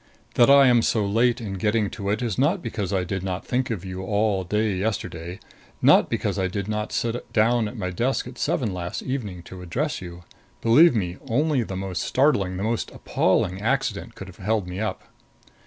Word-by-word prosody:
That 120 Hz, -, +5 dB
I 140 Hz, 0 st, +8 dB
am 120 Hz, -2 st, +5 dB
so 110 Hz, -2 st, +1 dB
late 115 Hz, +5 st, +2 dB
in 100 Hz, -5 st, -5 dB
getting 105 Hz, 0 st, +1 dB
to 100 Hz, -3 st, -4 dB
it 110 Hz, +4 st, 0 dB
is 120 Hz, 0 st, -2 dB
not 165 Hz, +7 st, +2 dB
because 100 Hz, -4 st, -3 dB
I 95 Hz, -2 st, +1 dB
did 95 Hz, +1 st, -3 dB
not 95 Hz, -1 st, -4 dB
think 130 Hz, +1 st, -1 dB
of 100 Hz, -6 st, -4 dB
you 95 Hz, 0 st, -5 dB
all 100 Hz, 0 st, 0 dB
day 105 Hz, +3 st, 0 dB
yesterday; 90 Hz, -4 st, -3 dB, 0.4 s
not -, -, +5 dB
because -, -, -1 dB
I 95 Hz, -, +1 dB
did 100 Hz, +1 st, -4 dB
not 105 Hz, 0 st, -2 dB
sit 120 Hz, +1 st, -2 dB
down 115 Hz, +1 st, +3 dB
at 120 Hz, -, -8 dB
my 90 Hz, -3 st, -3 dB
desk 125 Hz, +9 st, 0 dB
at 125 Hz, 0 st, -10 dB
seven 110 Hz, -7 st, 0 dB
last 90 Hz, -1 st, -4 dB
evening 105 Hz, -10 st, -4 dB
to 90 Hz, +1 st, -10 dB
address 130 Hz, -, -2 dB
you. 85 Hz, -1 st, -9 dB, 0.4 s
Believe 140 Hz, +6 st, +6 dB
me, 90 Hz, -4 st, -2 dB
only 145 Hz, +3 st, +2 dB
the 95 Hz, -5 st, -4 dB
most 95 Hz, -2 st, -3 dB
startling, 100 Hz, -10 st, +2 dB
the 95 Hz, -, -3 dB
most 115 Hz, +1 st, -1 dB
appalling 95 Hz, +2 st, 0 dB
accident 115 Hz, -, -1 dB
could 95 Hz, -, -9 dB
have 95 Hz, -, -13 dB
held 105 Hz, -1 st, -1 dB
me 90 Hz, +1 st, -5 dB
up. 110 Hz, 0 st, -3 dB
105 Hz, 205 wpm, -24 LUFS, 95-120 Hz, 0.4 s, I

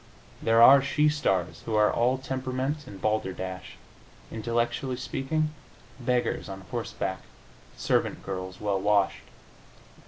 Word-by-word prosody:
There 115 Hz, +1 st, +5 dB
are 135 Hz, +3 st, +9 dB
she 150 Hz, +2 st, +2 dB
stars 95 Hz, -12 st, 0 dB
who 110 Hz, -, -1 dB
are 105 Hz, 0 st, +4 dB
all 125 Hz, +3 st, +2 dB
temperament 130 Hz, +2 st, -3 dB
and 100 Hz, -, -10 dB
balderdash 95 Hz, -3 st, -3 dB, 0.5 s
intellectually 120 Hz, +3 st, -1 dB
speaking, 150 Hz, +4 st, -2 dB, 0.5 s
beggars 125 Hz, -3 st, -1 dB
on 95 Hz, 0 st, -7 dB
horseback, 95 Hz, -5 st, -3 dB, 0.6 s
servant -, -, 0 dB
girls 95 Hz, -1 st, -5 dB
well 100 Hz, -2 st, -1 dB
washed. 100 Hz, -1 st, +1 dB
115 Hz, 115 wpm, -27 LUFS, 95-130 Hz, 0.6 s, are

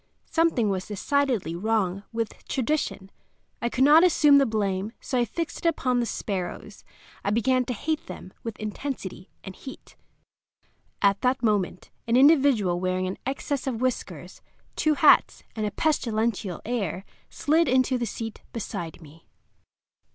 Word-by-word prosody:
Something 325 Hz, -10 st, +2 dB
was 185 Hz, -1 st, -3 dB
decidedly 225 Hz, -, 0 dB
wrong 195 Hz, -1 st, 0 dB
with 230 Hz, -2 st, -4 dB
tradition. 260 Hz, -7 st, -2 dB, 0.5 s
I 235 Hz, -, 0 dB
could 260 Hz, +2 st, +1 dB
not 305 Hz, +4 st, +7 dB
assume 300 Hz, -5 st, +6 dB
the 275 Hz, -, +3 dB
blame, 205 Hz, -1 st, -1 dB
so 255 Hz, -, -2 dB
I 240 Hz, -, +2 dB
fixed 330 Hz, -, -5 dB
it 335 Hz, -, +4 dB
upon 255 Hz, -6 st, 0 dB
the 235 Hz, -, 0 dB
sparrows. 200 Hz, 0 st, -5 dB, 0.4 s
I -, -, 0 dB
began 250 Hz, +4 st, +2 dB
to 250 Hz, -, -2 dB
hate 315 Hz, +8 st, -3 dB
them 185 Hz, -, -9 dB
with 230 Hz, -2 st, -6 dB
intensity 210 Hz, -4 st, -6 dB
and 190 Hz, -1 st, -8 dB
heat. 265 Hz, -, -11 dB, 1.1 s
At 200 Hz, 0 st, +3 dB
that 255 Hz, 0 st, +1 dB
moment 205 Hz, -5 st, 0 dB, 0.2 s
an 235 Hz, +1 st, +3 dB
individual 265 Hz, -, +4 dB
wearing 185 Hz, 0 st, -1 dB
an 185 Hz, +1 st, -4 dB
excess 275 Hz, 0 st, -3 dB
of 240 Hz, -4 st, -2 dB
whiskers, 255 Hz, -1 st, -3 dB, 0.3 s
two 310 Hz, -2 st, +2 dB
hats, 300 Hz, -, +4 dB
and 215 Hz, -2 st, -1 dB
a -, -, -3 dB
pestilential 225 Hz, -, -1 dB
air 205 Hz, -5 st, -2 dB, 0.2 s
slid 325 Hz, +3 st, +2 dB
into 255 Hz, 0 st, +2 dB
the 235 Hz, -, -1 dB
seat 225 Hz, +1 st, -6 dB
beside 175 Hz, -7 st, -5 dB
me. 155 Hz, +2 st, -17 dB
230 Hz, 150 wpm, -26 LUFS, 195-270 Hz, 1.1 s, not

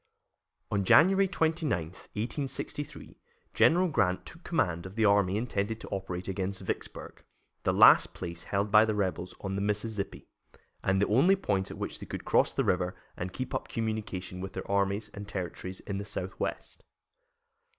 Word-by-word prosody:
On 100 Hz, -1 st, +1 dB
January 195 Hz, -, +6 dB
29, 165 Hz, -4 st, 0 dB
1863, 115 Hz, -, -5 dB, 0.3 s
General 180 Hz, +3 st, +5 dB
Grant 95 Hz, -, +1 dB
took 170 Hz, +1 st, -12 dB
command 90 Hz, -, 0 dB
of 95 Hz, -, -12 dB
the 110 Hz, -1 st, +2 dB
army 100 Hz, -1 st, +4 dB
intended 110 Hz, -1 st, -2 dB
to -, -, -9 dB
operate 95 Hz, -2 st, -4 dB
against 95 Hz, 0 st, -2 dB
Vicksburg, -, -, -5 dB, 0.4 s
the -, -, +1 dB
last -, -, +7 dB
place 85 Hz, 0 st, -6 dB
held 100 Hz, +1 st, -1 dB
by 105 Hz, 0 st, +8 dB
the 110 Hz, -1 st, 0 dB
rebels 95 Hz, -2 st, -2 dB
on 95 Hz, -1 st, -3 dB
the 100 Hz, -, -1 dB
Mississippi, 105 Hz, 0 st, -2 dB, 0.6 s
and 95 Hz, 0 st, +2 dB
the 100 Hz, -, +3 dB
only 140 Hz, -, +5 dB
point 100 Hz, -, -1 dB
at -, -, -8 dB
which -, -, -4 dB
they -, -, -9 dB
could -, -, -6 dB
cross -, -, +3 dB
the -, -, 0 dB
river 90 Hz, 0 st, +1 dB, 0.2 s
and 90 Hz, +1 st, -4 dB
keep 130 Hz, +6 st, -5 dB
up -, -, -2 dB
communication 105 Hz, -5 st, -3 dB
with 95 Hz, 0 st, -6 dB
their -, -, -5 dB
armies 100 Hz, +1 st, +1 dB
and 100 Hz, 0 st, -7 dB
territory 95 Hz, -1 st, -5 dB
in 100 Hz, -1 st, -3 dB
the 100 Hz, -, -5 dB
southwest. 95 Hz, -2 st, -4 dB
100 Hz, 165 wpm, -30 LUFS, 95-115 Hz, 0.6 s, by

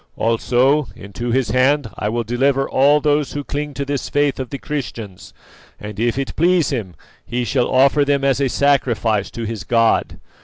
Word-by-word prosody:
Also, 125 Hz, +5 st, +2 dB
into 100 Hz, +5 st, -6 dB
his 130 Hz, +1 st, 0 dB
hand 135 Hz, +2 st, +2 dB
I 105 Hz, -, -2 dB
will 120 Hz, +2 st, -1 dB
deliver 135 Hz, +4 st, +1 dB
all 145 Hz, +3 st, +4 dB
those 150 Hz, -1 st, +1 dB
who 145 Hz, -, -4 dB
cling 145 Hz, 0 st, -5 dB
to 140 Hz, +2 st, -3 dB
this 140 Hz, -1 st, -3 dB
faith 145 Hz, -1 st, +1 dB
of 130 Hz, -2 st, -4 dB
the 140 Hz, -, -5 dB
Christians, 120 Hz, -10 st, -6 dB, 0.5 s
and, 105 Hz, 0 st, -8 dB
if 120 Hz, +2 st, 0 dB
it 135 Hz, -1 st, -3 dB
pleases 170 Hz, -2 st, +2 dB
him, 100 Hz, -9 st, -4 dB, 0.3 s
he 120 Hz, +1 st, -3 dB
shall 125 Hz, 0 st, 0 dB
offer 140 Hz, +3 st, +4 dB
them 140 Hz, -1 st, 0 dB
as 140 Hz, 0 st, +2 dB
a 135 Hz, -, +1 dB
sacrifice 120 Hz, -7 st, +1 dB
to 115 Hz, -, -7 dB
his 110 Hz, -3 st, -5 dB
god. 115 Hz, 0 st, +1 dB
130 Hz, 185 wpm, -19 LUFS, 115-140 Hz, 0.5 s, all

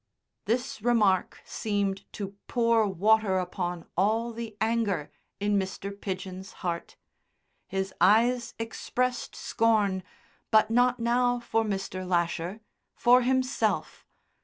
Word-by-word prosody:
This 240 Hz, -1 st, -1 dB
remark 210 Hz, -6 st, +2 dB
seemed 200 Hz, -2 st, -2 dB
to 200 Hz, -1 st, -6 dB
pour 230 Hz, -3 st, +3 dB
water 200 Hz, +1 st, +3 dB
upon 180 Hz, -1 st, -3 dB
all 225 Hz, +5 st, +1 dB
the 225 Hz, -2 st, -7 dB
anger 220 Hz, -8 st, 0 dB, 0.3 s
in 205 Hz, 0 st, +2 dB
Mr. 195 Hz, +1 st, -4 dB
Pidgen's 190 Hz, 0 st, -6 dB
heart. 170 Hz, -1 st, -3 dB, 0.7 s
His 190 Hz, 0 st, -3 dB
eyes 235 Hz, +2 st, +4 dB
expressed 245 Hz, +2 st, -2 dB
scorn, 210 Hz, -4 st, +1 dB, 0.5 s
but 215 Hz, 0 st, +4 dB
not 245 Hz, +1 st, +3 dB
now 245 Hz, +1 st, +2 dB
for 225 Hz, -1 st, 0 dB
Mr. 195 Hz, -3 st, -3 dB
Lasher 175 Hz, +2 st, -1 dB, 0.3 s
for 250 Hz, +1 st, +5 dB
himself. 260 Hz, +1 st, 0 dB
215 Hz, 110 wpm, -28 LUFS, 190-235 Hz, 0.7 s, for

